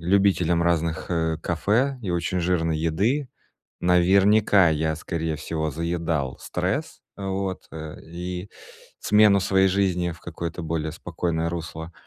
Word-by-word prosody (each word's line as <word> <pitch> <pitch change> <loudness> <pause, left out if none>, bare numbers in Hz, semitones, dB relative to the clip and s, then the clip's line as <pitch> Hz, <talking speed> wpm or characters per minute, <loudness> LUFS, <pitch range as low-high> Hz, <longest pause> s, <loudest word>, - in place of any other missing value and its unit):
любителем 90 -2 +3
разных, 85 -1 0
э, 80 -2 0
кафе 115 +10 +1
и 95 - -3
очень 85 +1 -1
жирной 80 -3 +1
еды. 105 - 0 0.5
Наверняка, 95 +2 +5
я, 80 0 0
скорее 80 -1 -3
всего, 80 0 -3
заедал 80 -3 -2
стресс, - - -3 0.2
вот, 95 -1 -3
э, 80 -1 -7
и 90 +3 -6 0.5
смену 105 -2 +5
своей 95 0 +3
жизни 90 -2 +1
в 85 - -14
какое-то 85 +1 -5
более 80 -1 -2
спокойное 85 -1 -2
русло, 80 0 -6
85 Hz, 125 wpm, -24 LUFS, 80-95 Hz, 0.5 s, Наверняка